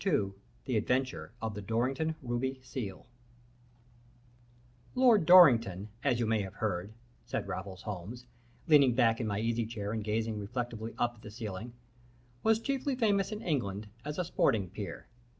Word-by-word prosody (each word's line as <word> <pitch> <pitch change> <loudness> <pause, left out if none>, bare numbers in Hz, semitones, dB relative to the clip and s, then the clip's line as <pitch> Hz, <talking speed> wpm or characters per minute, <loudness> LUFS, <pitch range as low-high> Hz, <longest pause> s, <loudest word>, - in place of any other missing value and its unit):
II 145 - +1 0.3
THE 125 -4 0
ADVENTURE 130 +4 -1
OF 110 -1 -2
THE 105 - -6
DORRINGTON 130 +9 0
RUBY 130 +2 -2
SEAL 105 -8 -6 1.9
"Lord 240 -9 +5
Dorrington, 115 - +7
as 130 -4 +2
you 120 - +1
may 110 -1 +1
have 95 0 -6
heard," 100 -3 -2 0.3
said - - -3
Raffles 95 0 -6
Holmes, 105 +5 -6 0.4
leaning 140 -6 +6
back 115 -2 +3
in 115 - -1
my 100 -1 -1
easy 115 0 0
chair 105 -3 -4
and 110 -1 -2
gazing 110 0 -1
reflectively 115 +1 -4
up 120 0 +1
at - - -18
the 105 - -9
ceiling, 110 +1 -6 0.7
"was 220 0 +4
chiefly 275 +2 -1
famous 205 -5 +2
in 215 0 -5
England 105 - -2
as 150 +1 -5
a 180 - 0
sporting 105 - +1
peer. - - -6
115 Hz, 155 wpm, -31 LUFS, 105-140 Hz, 1.9 s, Dorrington